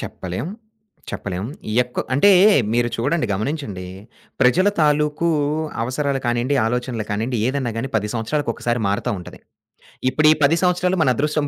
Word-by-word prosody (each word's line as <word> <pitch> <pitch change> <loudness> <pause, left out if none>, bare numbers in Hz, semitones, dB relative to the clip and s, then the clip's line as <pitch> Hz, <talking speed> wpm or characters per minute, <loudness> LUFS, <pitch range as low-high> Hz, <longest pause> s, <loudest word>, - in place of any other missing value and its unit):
చెప్పలేం. 95 - -5 0.6
చెప్పలేం. 95 0 -4 0.4
ఎక్ 125 0 -10 0.2
అంటే 200 +10 +5 0.4
మీరు 120 0 +2
చూడండి, 145 +8 0
గమనించండి. 105 - -3 0.6
ప్రజల 165 +11 +4
తాలూకు 150 +1 +2 0.5
అవసరాలు 135 +2 -1
కానియండి, 120 +3 0
ఆలోచనలు 120 -1 -2
కానియండి, 115 +4 -1
ఏదన్నా 130 -2 -1
గాని 120 +4 -2
పది 105 -1 0
సంవత్సరాలకొకసారి 120 0 -2
మారతా 100 +5 -1
ఉంటది. 90 - -11 0.7
ఇప్పుడు 155 +2 +3
ఈ - - +4
10 160 +4 +4
సంవత్సరాలు 180 0 +1
మన 130 - +4
అదృష్టం 150 +1 0
125 Hz, 130 wpm, -21 LUFS, 115-150 Hz, 0.7 s, అంటే